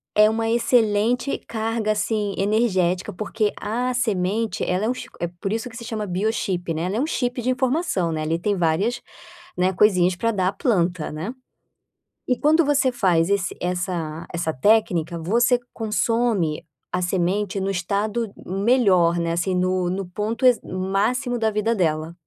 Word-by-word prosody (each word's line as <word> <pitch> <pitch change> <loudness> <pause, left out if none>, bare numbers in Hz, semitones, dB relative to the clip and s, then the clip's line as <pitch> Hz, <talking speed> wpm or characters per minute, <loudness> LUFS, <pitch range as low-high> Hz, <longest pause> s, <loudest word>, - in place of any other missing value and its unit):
é 210 0 +6
uma 225 +1 -1
excelente 230 +1 +2
carga, 225 -1 -1
assim, 210 -1 -1
energética, 195 -3 +1
porque 210 +2 -1
a 245 +4 -1
semente 215 -2 0
ela 185 +4 0
é - - +1
um - - +2 0.3
é 175 - -1
por 195 - -2
isso 225 +2 -2
que 225 - -14
se 235 - -8
chama 215 -2 -3
Biochip, 185 -2 -1
né, 160 +1 -3
ela 185 +4 -1
é - - 0
um 275 - +1
chip 250 -5 -1
de 245 - -1
informação, 255 - 0
né, 155 -1 -2
ali 160 +2 0
tem 200 +4 0
várias, 180 +7 0 0.6
né, 185 +1 +2
coisinhas 185 -2 +3
para 230 +6 0
dar 185 -4 +1
a - - -5
planta, 180 - 0
né. 160 +10 -5 0.9
E 250 - +1
quando 315 +2 +4
você 285 -2 +2
faz 180 -8 +2
esse 200 -3 0
essa 175 -3 -3
essa 170 -2 -1
técnica, 175 -1 +2
você 235 +9 +3 0.2
consome 220 -7 0 0.3
a 180 - -1
semente 185 +2 0
no 195 - -1
estado 205 +4 -1
melhor, 190 -4 +3
né, 170 0 -1
assim, 180 +2 0
no 185 0 +1
no 190 +2 -2
ponto 210 +7 -2
e 250 - +8
máximo 200 +7 -1
da 220 -1 +2
vida 215 +2 0
dela. 160 -3 0
200 Hz, 165 wpm, -23 LUFS, 180-230 Hz, 0.9 s, e